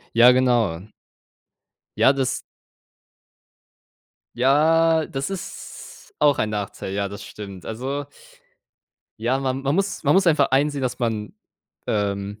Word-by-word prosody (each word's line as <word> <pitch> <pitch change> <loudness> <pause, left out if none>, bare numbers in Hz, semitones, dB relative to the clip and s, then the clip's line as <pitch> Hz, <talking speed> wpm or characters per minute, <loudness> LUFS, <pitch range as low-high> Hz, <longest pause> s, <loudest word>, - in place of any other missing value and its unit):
Ja, 120 +2 +8
genau. 120 -9 +2 1.2
Ja, 135 - +5
das 135 -2 -1 1.9
Ja, 160 +5 +3
das 135 0 -4
ist 195 -3 -9
auch 145 -2 +3
ein 110 - +1
Nachteil, 100 -2 -4
ja, 100 0 -1
das 100 - -9
stimmt. 100 -3 -9
Also, 135 +5 -4 1.1
ja, 120 +4 0
man 135 0 -2
man 140 +2 0
muss 195 -3 -1
man 145 - +4
muss 190 0 +4
einfach 155 - +3
einsehen, 140 0 +1
dass 125 0 -2
man, 110 -3 -2 0.5
ähm, 100 0 -2
130 Hz, 120 wpm, -23 LUFS, 105-145 Hz, 1.9 s, Ja